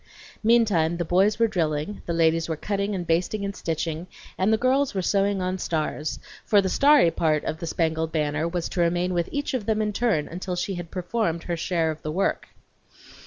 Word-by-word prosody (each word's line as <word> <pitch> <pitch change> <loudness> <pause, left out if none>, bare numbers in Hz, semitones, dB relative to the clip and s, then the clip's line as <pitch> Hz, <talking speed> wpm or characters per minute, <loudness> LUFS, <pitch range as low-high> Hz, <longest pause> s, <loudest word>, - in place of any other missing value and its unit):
Meantime 210 -8 +3
the 175 - -2
boys 190 +5 +3
were 230 - +3
drilling, 165 -2 -2
the - - -1
ladies 165 0 +2
were 160 - 0
cutting 200 +3 -2
and 180 -2 -3
basting 180 +5 0
and 200 0 -4
stitching, 165 +1 -3 0.3
and 190 +3 +1
the 220 - +4
girls 260 +1 +1
were 190 - 0
sewing 195 0 +1
on 185 +1 -2
stars; 155 -2 -2 0.3
for 210 - +4
the 195 - +1
starry 280 - +5
part 155 -3 +1
of 160 - -3
the 170 - -5
spangled 160 0 -1
banner 155 0 0
was 170 0 -2
to 175 - -2
remain 175 +2 +1
with 170 -1 -1
each 285 -1 -2
of 240 -6 -2
them 220 -1 +1
in 210 -1 0
turn 200 -9 +1
until 180 +1 -4
she 185 +2 -2
had 175 -2 -6
performed 180 -2 -2
her 175 - -2
share 165 -1 0
of 155 - -8
the 155 - -4
work. 190 +5 -1
175 Hz, 210 wpm, -25 LUFS, 165-205 Hz, 0.3 s, starry